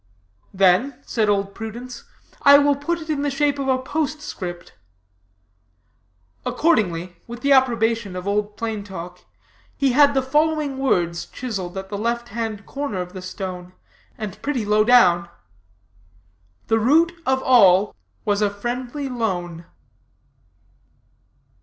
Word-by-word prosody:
Then,' 195 +7 +3
said 215 -3 0
Old 200 -1 0
Prudence, 235 +3 -8 0.4
'I 285 -1 +8
will 285 0 +3
put 305 +5 -2
it 315 - -9
in 300 -3 -1
the 290 - 0
shape 285 +1 0
of 275 - -2
a 260 -1 +3
postscript.' 265 - -4 1.7
Accordingly, 205 - 0
with 235 +1 -8
the 280 - +1
approbation 230 -6 +2
of 180 +1 -6
Old 205 +1 -1
Plain 220 -3 -3
Talk, 180 -2 -8 0.6
he 275 -2 +2
had 285 +2 +5
the 265 - +2
following 300 0 0
words 175 -10 0
chiseled 195 -8 -5
at 190 0 -6
the 200 0 -4
left 235 +2 -2
hand 220 -2 -4
corner 280 -8 -4
of 180 0 -5
the 185 - -7
stone, 185 -1 -7 0.4
and 210 -3 -7
pretty 265 -6 -2
low 210 +1 +3
down: 180 -8 +5 1.4
'The 225 - +2
root 310 +9 +4 0.2
of 265 0 +1
all 205 -6 +5 0.3
was 205 -1 +1
a 205 - +3
friendly 245 +7 -4
loan.'" 175 -9 -3
230 Hz, 135 wpm, -22 LUFS, 195-270 Hz, 1.7 s, I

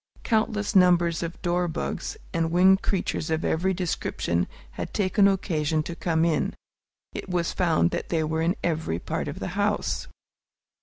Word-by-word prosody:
Countless 215 -2 0
numbers 175 -2 +4
of 170 0 -5
dorbugs 175 - -2 0.2
and 165 -1 +1
winged 190 +3 +5
creatures 180 -4 -1
of 160 +1 0
every 180 +4 +1
description 165 - -1 0.2
had - - -6
taken 200 0 +4
occasion 160 -5 0
to 170 - -6
come 165 -2 +1
in. 160 -3 0 0.6
It - - -6
was 175 -2 0
found 160 - +2
that - - -3
they 160 -2 +1
were 160 +1 -1
in 170 +4 +1
every 160 - -1
part - - -3
of - - -5
the - - -4
house. - - -1
170 Hz, 155 wpm, -26 LUFS, 160-185 Hz, 0.6 s, winged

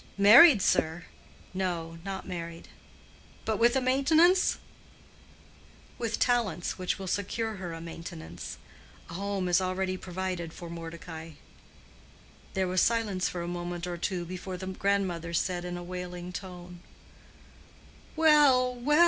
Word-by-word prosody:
"Married, 220 - +9
sir?" 160 +1 +1 0.5
"No, 170 -3 -3
not 195 0 -5
married." 170 -2 -6 0.8
"But 220 -2 0
with 235 +2 +4
a 265 - +3
maintenance?" 315 +8 +4 1.4
"With 230 -1 -1
talents 210 -9 0
which 185 - -1
will 195 - -6
secure 205 +3 -2
her 180 -2 -5
a 165 0 -7
maintenance. 85 - -8 0.5
A - - -8
home 195 0 -2
is 175 +1 +3
already 185 0 -1
provided 180 -2 -4
for 170 -1 -9
Mordecai." 165 -1 -8 1.2
There 190 -1 +1
was 185 0 +2
silence 215 -5 +1
for 175 -1 -4
a - - -5
moment 175 0 -4
or 175 -1 -4
two 175 0 -2
before 185 +1 -6
the 185 - -6
grandmother 185 -3 -1
said 175 0 0
in 175 0 -4
a 175 - -6
wailing 180 0 -6
tone, 180 -2 -8 1.4
"Well, 295 -6 +5
well! 285 +6 +2
185 Hz, 130 wpm, -29 LUFS, 175-210 Hz, 1.4 s, Married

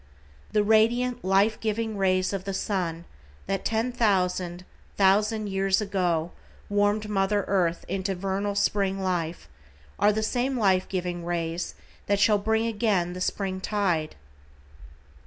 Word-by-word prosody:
The 210 - +3
radiant, 235 +3 +2
life 195 +3 +3
giving 220 0 -2
rays 185 -1 +1
of 195 -2 -3
the 195 -1 -3
sun 175 -5 -2 0.4
that 195 0 -2
ten 225 +3 0
thousand, 180 -6 0 0.3
thousand 210 +3 +3
years 195 0 +1
ago 180 -5 0 0.4
warmed 205 +1 +1
mother 200 0 +1
earth 175 -3 0
into 190 +1 -2
vernal 195 +2 -2
spring 200 -1 +1
life, 175 -3 -2 0.5
are 205 - +5
the 220 +1 -1
same 250 +4 0
life 190 -4 +2
giving 180 -2 -3
rays 170 0 -3 0.3
that 200 0 +2
shall 210 0 +4
bring 220 +2 +1
again 205 -6 0
the 180 - -7
spring 190 0 -2
tide. 185 -7 -1
195 Hz, 135 wpm, -26 LUFS, 185-215 Hz, 0.5 s, are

